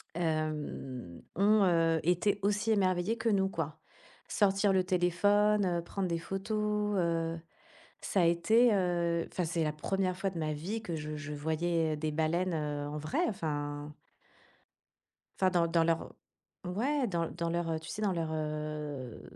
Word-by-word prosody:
Hem, 150 - -3 0.2
ont, 210 +1 +5
heu, 165 -3 +3
été 180 +4 +2
aussi 210 +2 +1
émerveillés 190 +1 +2
que 230 - 0
nous, 195 -2 +3
quoi. 160 -3 -4 0.5
Sortir 195 -1 +3
le 190 -1 +3
téléphone, 205 +3 +3
heu, 175 -2 0
prendre 190 +2 -3
des 170 -1 0
photos, 210 +3 -1
heu 165 -1 0 0.6
Ça 195 - +1
a - - +4
été, 220 +8 +4
heu, 175 -3 +1
enfin, 180 - -1
c'est 165 0 0
la 155 - +1
1re 185 +4 -1
fois 195 +1 0
de 180 - -8
ma 155 -1 -1
vie 190 +10 -4
que 175 -7 -4
je 150 0 -5
je 150 0 -6
voyais, 160 +2 0
heu, - - -3
des 155 +1 -2
baleines, 165 +4 0
heu, 150 -2 -2
en 150 - -4
vrai, 155 - -2
enfin. 145 -4 -3 1.5
Enfin, 185 -1 +3
dans 170 -2 +3
dans 165 0 +3
leur 165 0 0 0.5
ouais, 255 +10 0
dans 170 -4 -1
dans 170 -1 -3
leur, 170 0 -1
heu, 160 -1 -1
tu 160 - -10
sais? 215 - -5
Dans 205 -2 +2
leur, 165 -3 -2
heu 150 -4 -4
170 Hz, 165 wpm, -31 LUFS, 155-195 Hz, 1.5 s, ont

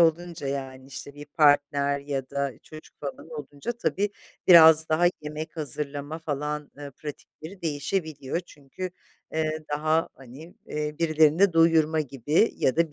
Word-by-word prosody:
olunca, 170 -1 +1
yani, 135 -1 -5
işte, 140 +1 -8
bir 145 - -9
partner 145 -1 +3
ya 140 -2 -4
da 140 -1 -1
çocuk 155 0 -13
falan 145 +3 -7
olunca 145 - -5
tabii, 205 -3 -1 0.4
biraz 160 -2 +8
daha 165 +3 +3
yemek 155 +2 -6
hazırlama 145 0 -3
falan, 150 -1 -4
ııı, 140 -2 -8
pratikleri 155 +5 -10
değişebiliyor. 155 -1 -2
Çünkü, 170 +3 -8 0.4
eee, 155 0 -1
daha, 155 +2 +1
hani, 135 +7 -13
eee, 150 0 -3
birilerini 160 +3 +4
doyurma 165 -1 +4
gibi 145 - +1
ya 130 - +1
da 165 -2 +2
150 Hz, 135 wpm, -26 LUFS, 140-160 Hz, 0.4 s, biraz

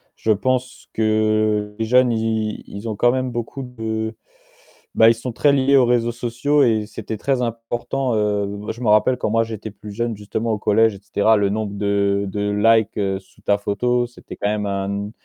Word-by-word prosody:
Je 110 - 0
pense 125 +4 -1
que 110 -1 +1
les 110 - -1
jeunes, 125 +2 +4
ils 110 -1 -1
ils 105 +3 -7
ont 110 - -3
quand 120 +4 +3
même 130 0 -1
beaucoup 120 +3 -5
de 110 -3 -4 0.8
bah 110 - +6
ils - - +5
sont 120 +2 -5
très 145 +4 +3
liés 140 0 +4
aux 130 - +5
réseaux 120 -1 +2
sociaux 125 +5 +1
et 110 -4 +1
c'était 110 - -6
très 130 +3 0
important, 120 +2 -2
heu 105 -1 0 0.2
je 120 - -10
me 115 - +1
rappelle 105 +4 +4
quand 115 - -1
moi 115 0 +3
j'étais 110 -1 -6
plus 105 +1 -11
jeune 115 0 -2
justement 110 +2 -3
au - - -1
collège 110 +1 +3
et - - -12
cetera, 110 +2 +2
le 100 -1 +1
nombre 105 0 -2
de 100 0 +1
de 105 +1 -2
likes, 110 +1 +3
heu, 95 -2 -1
sous 95 - -24
ta 100 - +2
photo, 120 +4 0
c'était 120 - -12
quand 100 - -1
même 105 0 -1
un 100 +1 -3
110 Hz, 200 wpm, -21 LUFS, 105-120 Hz, 0.8 s, bah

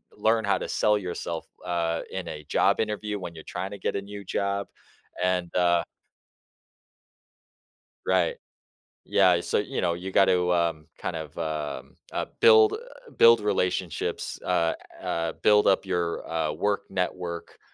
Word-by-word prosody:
learn 110 -1 +2
how 100 - +2
to - - -5
sell 105 0 +3
yourself, 85 -3 -4 0.2
uh, 85 -2 -1
in 95 -1 -5
a 75 -1 -7
job - - +2
interview 105 -1 -2
when 85 -3 -7
you're 80 - -10
trying 95 +3 -5
to 100 - -6
get - - -2
a 100 - -1
new 100 0 -8
job, 100 +1 -1 0.6
and 90 -2 0
uh 85 -1 +4 2.3
Right, 90 -2 +2 0.7
yeah, 95 -2 +4
eh, 85 - +2
so, - - 0
you 105 - -2
know, 85 -1 +1
you 95 +2 -6
got 95 - +5
to 85 -3 +1
kind - - -3
of 80 -2 -7
um, 75 -3 -4 0.2
uh, - - -2
build 435 -2 +7 0.4
build 115 -1 +8
relationships, 90 -4 -1
uh 85 0 +2 0.3
uh, 85 0 -1
build 105 0 +5
up 95 - +4
your, 90 -3 -2
uh, 80 -2 0
work 100 0 0
network, 90 -2 -3
90 Hz, 150 wpm, -26 LUFS, 85-100 Hz, 2.3 s, build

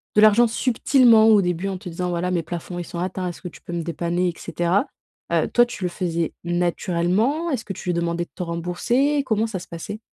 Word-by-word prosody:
de 210 - +6
l'argent 215 +3 +7
subtilement 235 -1 +4
au 210 -2 +6
début, 180 +1 -1
en 190 - -3
te 180 - -8
disant: 180 +2 -3
«Voilà, 175 +1 -1
mes 170 -2 0
plafonds, 175 +1 -6
ils 175 - -5
sont 170 - -6
atteints. 185 0 -3
Est-ce 160 - -9
que 180 - -6
tu - - -16
peux 175 - -7
me 170 - -1
dépanner 175 +2 -1
et - - -4
cetera», 175 - 0 0.5
heu, - - +2
toi, 240 0 +5
tu 220 -5 -9
le 180 - 0
faisais 170 -3 -2
naturellement? 180 - 0
Est-ce 245 -6 -2
que 195 - -4
tu 180 - -6
lui - - +2
demandais 170 0 -1
de - - -33
te 180 - -4
rembourser? 235 - 0
Comment 220 -2 +1
ça 205 -4 -4
se - - -11
passait? 170 +6 -7
180 Hz, 235 wpm, -23 LUFS, 170-220 Hz, 0.5 s, l'argent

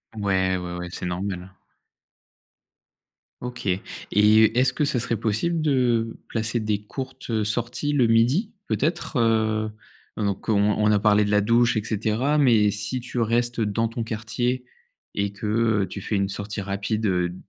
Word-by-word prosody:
Ouais, 95 -3 +1
ouais, 90 -1 -5
ouais, 90 0 -5
c'est - - -6
normal, 90 +1 -3
heu. 95 0 -17 1.8
OK 125 -3 -6 0.4
et 110 +3 +5
est-ce 130 0 +3
que 150 - 0
ça 135 -3 0
serait 115 0 -1
possible 115 - 0
de 120 -6 +1
placer 115 +1 -1
des 105 -2 -1
courtes, 130 +4 -7
heu, 110 -2 +1
sorties 120 +6 -1
le 135 -4 +4
midi, 125 - +3 0.2
peut-être? 165 +3 -1
Heu 110 -2 +1 0.5
heu, - - -3
donc 100 +2 -3
on 110 - +3 0.2
on 105 0 +3
a 105 - +3
parlé 105 0 +4
de 105 - -1
la 105 - +4
douche 115 +2 +3
et 105 - 0
cetera, 115 +7 0
mais 115 -7 +4
si 105 +5 -2
tu 125 0 -5
restes 120 +1 +1
dans 110 +2 0
ton 115 +1 -4
quartier 115 +3 -2 0.5
et 100 0 0
que, 105 +2 -8 0.4
heu, 95 - -3
tu 100 - -7
fais 105 - -2
une 100 -1 +1
sortie 100 +2 -5
rapide, 100 +3 -2
heu, 90 -3 +1
d 90 - -9
110 Hz, 175 wpm, -24 LUFS, 105-120 Hz, 1.8 s, et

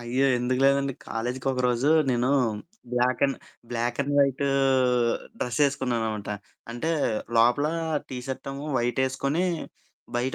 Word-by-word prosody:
అయ్యో! 125 +3 +1
ఎందుకు 125 +1 0
లేదండి. 140 0 +3 0.2
కాలేజికి 125 +3 -3
ఒకరోజు 125 +2 +1 0.2
నేను 125 +1 +1 0.6
black 125 +2 +1
and 135 - -3 0.3
black 120 0 -2
and 140 +1 -3
why to 140 0 +2 0.9
dress 125 +4 -2
యేసుకున్నాననమాట. 120 -6 -1 0.4
అంటే 140 +8 -2 0.5
లోపల 120 +6 +4 0.4
టీ 130 - -5
షర్ట్ 135 +1 -5
ఏమో 140 +2 -6
వైట్ 120 +2 0
యేస్కొని 140 +6 0 0.7
బయట 125 +2 -1
130 Hz, 120 wpm, -26 LUFS, 120-140 Hz, 0.9 s, లోపల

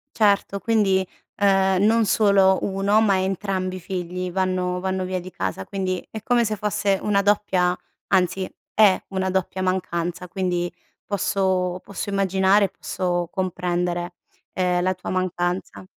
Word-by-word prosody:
Certo 200 -2 +2
quindi, 195 -5 +2 0.3
ehm, 195 -2 +3
non 225 +1 +4
solo 200 -3 +4
1, 200 +2 +2
ma 205 -3 +3
entrambi 190 -1 -2
i - - -8
figli 180 0 -4
vanno 180 0 -1
vanno 190 0 -1
via 185 -1 -3
di 185 +1 -10
casa, 95 0 -4
quindi 185 -2 -3
è 220 - -6
come 240 +1 +2
se 215 -1 -2
fosse 200 -1 0
una 200 -1 +2
doppia 190 -3 +2 0.3
anzi, 185 +1 +1 0.3
è 205 -3 +5
una 190 -1 -1
doppia 190 0 -1
mancanza 180 -1 -2
quindi, 175 -1 -1 0.4
posso, 190 -2 0
posso 200 +1 -6
immaginare, 195 +1 +3
posso 175 -2 -2
comprendere, 175 -1 -2 0.4
ehm, 180 -1 0
la 185 +1 +2
tua 180 - -7
mancanza. 185 0 -2
190 Hz, 140 wpm, -23 LUFS, 180-200 Hz, 0.4 s, è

